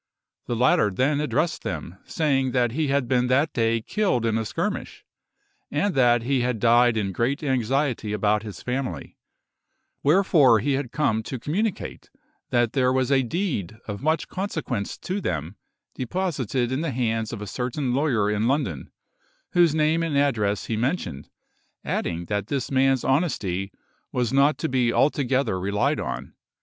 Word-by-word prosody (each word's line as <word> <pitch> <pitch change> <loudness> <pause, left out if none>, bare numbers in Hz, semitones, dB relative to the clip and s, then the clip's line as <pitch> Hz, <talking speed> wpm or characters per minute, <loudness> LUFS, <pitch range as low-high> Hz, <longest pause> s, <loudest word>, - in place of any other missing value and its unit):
The 120 - -1
latter 115 -3 +3
then 135 +9 +1
addressed 155 +2 0
them, 85 +4 -5
saying 135 -5 0
that 120 -2 +2
he 155 +4 -1
had 140 -2 +1
been 125 0 +2
that 140 +5 +2
day 115 -1 +1
killed 185 - 0
in 110 -1 +1
a 110 0 -1
skirmish, 110 - -4 0.6
and 180 +7 0
that 120 -4 +4
he 130 +1 +1
had 125 -1 0
died 120 0 +4
in 100 -3 -1
great 130 - -1
anxiety 130 -3 0
about 105 0 +1
his 105 -2 -9
family, 125 +1 -4 0.8
wherefore 150 - +5
he 120 +7 0
had 135 -3 -2
come 130 -8 +1
to 130 +4 -5
communicate 190 - -3 0.4
that 120 -2 +1
there 125 -2 +2
was 130 +1 +1
a 135 -1 +4
deed 125 - -2
of 105 -1 -5
much 155 +3 0
consequence 160 - -3
to 190 +2 -4
them 80 - -3 0.4
deposited 130 - -2
in 130 +3 -1
the 165 - -1
hands 115 -3 -1
of - - -5
a 105 - -5
certain 125 +4 -2
lawyer 130 -7 +1
in 105 +2 +1
London, 125 - -1 0.6
whose 170 -3 +4
name 155 +1 +2
and 160 -4 0
address 110 -8 +1
he 115 - -2
mentioned, 110 - -2 0.6
adding 85 0 -2
that 100 +1 -2
this 135 0 -2
man's 135 -1 +3
honesty 100 - 0 0.4
was 125 -1 -1
not 140 +2 +4
to 160 - -2
be 125 -4 +1
altogether 135 -7 +1
relied 105 +10 0
on. - - -5
125 Hz, 160 wpm, -24 LUFS, 110-145 Hz, 0.8 s, wherefore